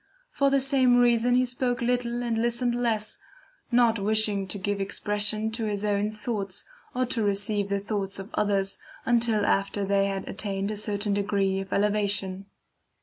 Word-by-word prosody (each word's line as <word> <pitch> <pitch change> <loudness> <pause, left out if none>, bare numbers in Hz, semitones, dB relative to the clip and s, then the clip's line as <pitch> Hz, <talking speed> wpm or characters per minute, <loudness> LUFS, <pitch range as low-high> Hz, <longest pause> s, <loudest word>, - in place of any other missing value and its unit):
For 280 -1 +2
the 275 0 +3
same 260 -2 +4
reason 245 0 +4
he 255 0 +3
spoke 245 0 -2
little 240 0 -1
and 235 -1 -1
listened 240 +1 +1
less, 230 -3 -1 0.5
not 235 -2 +3
wishing 210 -1 +1
to 195 - -1
give 200 +1 -2
expression 210 +2 0
to 225 0 -3
his 210 -1 -2
own 205 0 +1
thoughts, 210 -3 -4 0.3
or 255 0 +1
to 245 -2 -1
receive 205 0 0
the 200 0 0
thoughts 200 -1 -3
of 195 +2 -8
others, 195 -2 0 0.3
until 230 -3 +3
after 195 0 0
they 200 0 +2
had 195 -1 -4
attained 200 0 -3
a - - -3
certain 205 0 0
degree 200 -1 0
of 195 0 -7
elevation." 200 -2 0
210 Hz, 165 wpm, -26 LUFS, 200-235 Hz, 0.5 s, same